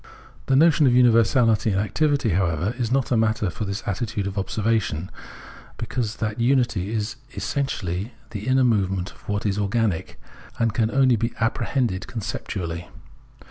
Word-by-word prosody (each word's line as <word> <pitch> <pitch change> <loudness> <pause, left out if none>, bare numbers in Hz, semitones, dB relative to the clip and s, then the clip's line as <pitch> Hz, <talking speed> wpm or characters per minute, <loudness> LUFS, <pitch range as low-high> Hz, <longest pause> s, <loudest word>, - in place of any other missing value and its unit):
This 135 - +4 0.2
union 140 -5 +5
of 125 - +4
universality 115 -2 +4
and 95 -1 +1
activity, 140 +4 +1
however, 90 +1 0
is 120 -2 -1
not 135 -1 +1
a - - +4
matter 110 -3 +1
for 110 +1 -4
this 100 +1 -4
attitude 105 0 -2
of 100 0 -4
observation, 100 -4 -1 0.7
because 115 -4 -3
that 110 0 -3
unity 120 -6 +1
is 110 +1 -2 0.2
essentially 105 - -2 0.2
the 105 +1 -6
inner 130 0 +4
movement 95 -6 +1
of - - -17
what 105 0 -1
is 100 -1 0
organic, 105 -3 -1 0.4
and 115 -2 +1
can 110 -1 +1
only 130 -1 +3
be 115 +2 -2
apprehended 115 -3 0
conceptually. 90 -6 -5
110 Hz, 150 wpm, -23 LUFS, 100-120 Hz, 0.7 s, union